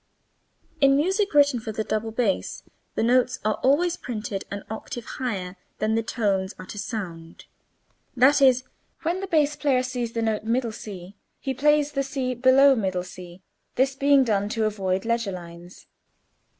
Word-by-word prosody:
In 275 -1 +5
music 385 +8 +1
written 285 -4 +5
for 220 0 -5
double 215 +1 -2
bass 220 -3 -1 0.3
the - - 0
notes 250 +2 +3
are 215 - 0
always 335 +6 +2
printed 215 -4 -5
an 200 0 -6
octave 220 +2 -6
higher 195 -7 -4 0.2
than 215 +1 0
the 225 - +2
tones 200 -4 -1
are 185 - -9
to 210 - -8
sound: 175 -8 -6 0.7
that 275 +4 +5
is, 255 -2 +5 0.4
when 340 +3 0
the 390 - -4
bass 300 -4 +2
player 270 -4 +1
sees 245 -2 -3
the 230 - -1
note 220 -1 -1
[Illustration: 235 +1 0 0.4
c] - - -43 0.2
he 270 - -3
plays 295 +2 +2
[Illustration: 260 -6 +3
C] 180 0 -11 0.3
this 270 +2 +2
being 280 0 +4
done 205 -4 0
to 220 0 0
avoid 195 -2 -1
leger 230 -4 0
lines. 175 0 -11
235 Hz, 150 wpm, -25 LUFS, 205-275 Hz, 0.7 s, In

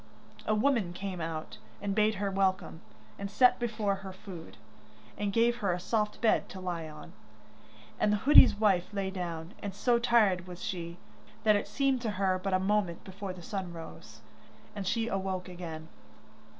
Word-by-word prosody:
A 215 - +3
woman 215 -6 +2
came 185 -1 -5
out, 160 -1 -5 0.2
and 200 -1 -2
bade 215 +1 +3
her 200 0 -1
welcome, 190 -4 0 0.4
and 200 0 -4
set 250 +5 +5
before 215 -4 -1
her 195 -1 -8
food, 185 -3 -10 0.6
and 205 -1 -1
gave 235 +3 +3
her 200 -6 0
a 175 - -3
soft 210 +3 -1
bed 225 - +3
to 190 - -8
lie 175 -3 -4
on. 150 0 -11 0.9
And 210 - +3
the 210 - +3
hoodie's 265 +3 +8
wife 200 -4 +2
lay 195 -1 -1
down, 170 -1 -5
and 200 -2 -5
so 235 +3 +2
tired 210 -7 +3
was 180 0 -8
she, 175 -5 -4 0.5
that 215 -1 +5
it 205 - -1
seemed 265 +4 +1
to 230 - -1
her 190 -1 +2
but 195 - -1
a - - +3
moment 190 -3 0
before 195 0 -6
the 180 -1 -11
sun 190 -3 -4
rose, 165 -1 -10 0.5
and 200 -2 -4
she 230 +2 0
awoke 190 -3 -2
again. 165 -3 -7
195 Hz, 175 wpm, -30 LUFS, 180-215 Hz, 0.9 s, hoodie's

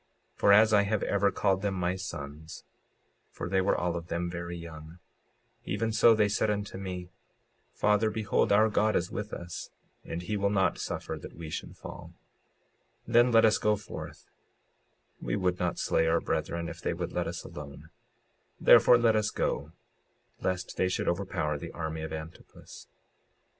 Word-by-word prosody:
56:46 - - -36
For 100 - +6
as 110 +1 +6
I 105 - +6
had 100 +1 0
ever 100 0 +2
called 95 -2 +1
them 100 -1 -1
my 90 0 0
sons 80 -4 -7 0.7
(for - - -6
they 95 -1 +2
were 95 - +2
all 90 -1 -1
of 85 -1 -5
them 85 0 -2
very 85 0 -5
young) 80 0 -10 0.7
even 115 0 -1
so 115 +1 +6
they 105 -1 +3
said 105 +1 0
unto 100 -2 -3
me: 90 -2 -6 0.6
Father, 105 +1 +2
behold 105 -2 0
our 110 +2 +5
God 105 +1 +2
is 90 +1 0
with 105 0 -5
us, 85 0 -7 0.3
and 85 +2 -5
he 105 +4 -2
will 100 0 +1
not 95 -4 +1
suffer - - -4
that - - -10
we 80 -1 -8
should - - -6
fall; - - -10 0.9
then 120 +1 +4
let 115 -1 +6
us 110 - +4
go 105 0 +2
forth; 105 - -9 1.0
we - - -2
would 90 -2 0
not 90 -1 -1
slay 80 - +1
our 85 +1 +3
brethren 85 0 -2
if - - -8
they - - -1
would - - -4
let - - -2
us - - -5
alone; 70 -1 -10 0.7
therefore 120 - +7
let 115 -2 +3
us 110 0 +2
go, 75 +2 -2 0.7
lest 95 0 -3
they 95 - +2
should 95 - -2
overpower 85 -5 -1
the - - -7
army 80 -1 -4
of 80 - -5
Antipus. 80 +1 -10
95 Hz, 175 wpm, -29 LUFS, 85-105 Hz, 1.0 s, therefore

